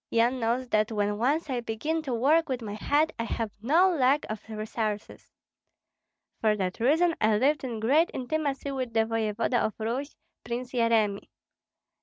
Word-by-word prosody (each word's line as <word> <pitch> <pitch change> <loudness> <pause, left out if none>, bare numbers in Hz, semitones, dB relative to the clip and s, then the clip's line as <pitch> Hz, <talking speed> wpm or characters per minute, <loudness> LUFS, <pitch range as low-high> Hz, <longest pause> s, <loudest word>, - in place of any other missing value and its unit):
Yan 240 +3 +2
knows 240 +2 0
that 215 0 +2
when 205 -1 -1
once 290 +8 +1
I 255 -3 -1
begin 270 +8 -2
to 285 -4 -5
work 300 +7 +3
with 250 -3 -2
my 205 -2 -5
head 290 +9 +1
I 230 - -1
have 225 -2 -3
no 320 +11 +4
lack 275 +1 +3
of 215 -1 -5
resources. 215 -1 -4 1.1
For 215 -1 +2
that 185 -3 -3
reason 320 +8 +3
I 215 -1 +3
lived 280 +5 +2
in 240 -4 -4
great 285 +10 +3
intimacy 280 +1 -2
with 255 -4 -4
the 225 0 +3
voevoda 225 +2 0
of 215 - -1
Rus, 245 +6 -3 0.3
Prince 245 +1 -4
Yeremi. 225 -4 +1
235 Hz, 165 wpm, -27 LUFS, 220-280 Hz, 1.1 s, no